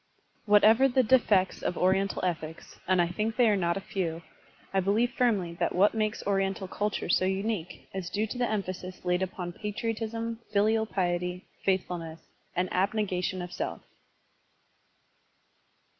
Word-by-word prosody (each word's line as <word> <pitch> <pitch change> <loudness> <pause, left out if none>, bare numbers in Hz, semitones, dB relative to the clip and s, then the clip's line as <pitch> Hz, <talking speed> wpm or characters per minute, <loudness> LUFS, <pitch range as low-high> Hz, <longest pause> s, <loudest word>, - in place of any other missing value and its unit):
Whatever 215 +5 +6
be - - -8
the 260 - +6
defects 215 -6 +3
of - - -2
Oriental 190 +1 +1
ethics, 160 -2 -5
— - - -27
and 185 0 +3
I 175 - +4
think 215 +5 -2
they 245 -2 +4
are 210 - +4
not 170 -2 0
a - - -4
few, 170 -4 -3 0.3
— - - -29
I 195 - +3
firmly 205 +6 +2
believe 195 -9 +1
that - - 0
what 195 +3 +4
makes 215 -1 -1
Oriental 195 -1 0
ctiltiire 205 -1 -2
so 185 - +3
unique 190 -1 -2
is 190 -2 -4
due 210 +2 0
to 245 +3 -6
the 245 - +1
emphasis 185 -3 -4
laid 180 0 +1
upon 180 -1 -4
patriotism, 225 +2 -3
filial 220 +2 +2
piety, 180 -2 -1 0.2
faithfulness, 175 -4 -1 0.4
and 180 +1 +1
abnegation 185 -2 0
of 180 - -8
self. - - -4
195 Hz, 160 wpm, -29 LUFS, 180-215 Hz, 0.4 s, Whatever